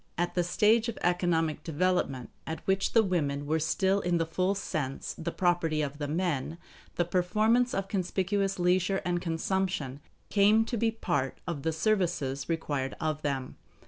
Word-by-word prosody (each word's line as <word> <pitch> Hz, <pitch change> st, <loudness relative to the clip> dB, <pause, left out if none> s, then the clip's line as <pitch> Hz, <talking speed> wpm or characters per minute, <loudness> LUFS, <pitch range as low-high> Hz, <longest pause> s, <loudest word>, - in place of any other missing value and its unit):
At 175 Hz, +1 st, 0 dB
the 175 Hz, -, +1 dB
stage 220 Hz, +6 st, +3 dB
of 230 Hz, -, -5 dB
economic 175 Hz, -3 st, +1 dB
development 160 Hz, -6 st, 0 dB, 0.2 s
at 160 Hz, -1 st, -5 dB
which 190 Hz, 0 st, +1 dB
the 225 Hz, -, +6 dB
women 145 Hz, -7 st, -1 dB
were 160 Hz, +2 st, +1 dB
still 190 Hz, +5 st, +1 dB
in 175 Hz, -2 st, +1 dB
the 165 Hz, -, +1 dB
full 185 Hz, +4 st, 0 dB
sense 145 Hz, -8 st, -3 dB
the 170 Hz, +1 st, -4 dB
property 170 Hz, -4 st, +1 dB
of 145 Hz, 0 st, -5 dB
the 145 Hz, -, -2 dB
men, 160 Hz, -1 st, -1 dB, 0.4 s
the 175 Hz, -, +1 dB
performance 215 Hz, +8 st, +2 dB
of 195 Hz, 0 st, -2 dB
conspicuous 195 Hz, +1 st, 0 dB
leisure 185 Hz, +2 st, +2 dB
and 175 Hz, -1 st, 0 dB
consumption 165 Hz, -5 st, -1 dB, 0.3 s
came 210 Hz, +2 st, +4 dB
to 240 Hz, -, -3 dB
be 230 Hz, 0 st, +2 dB
part 140 Hz, -12 st, -2 dB
of 170 Hz, -5 st, -3 dB
the 160 Hz, -, 0 dB
services 160 Hz, -7 st, 0 dB
required 145 Hz, -5 st, -2 dB
of 155 Hz, -1 st, -1 dB
them. 135 Hz, -3 st, -3 dB
175 Hz, 165 wpm, -29 LUFS, 155-195 Hz, 0.4 s, the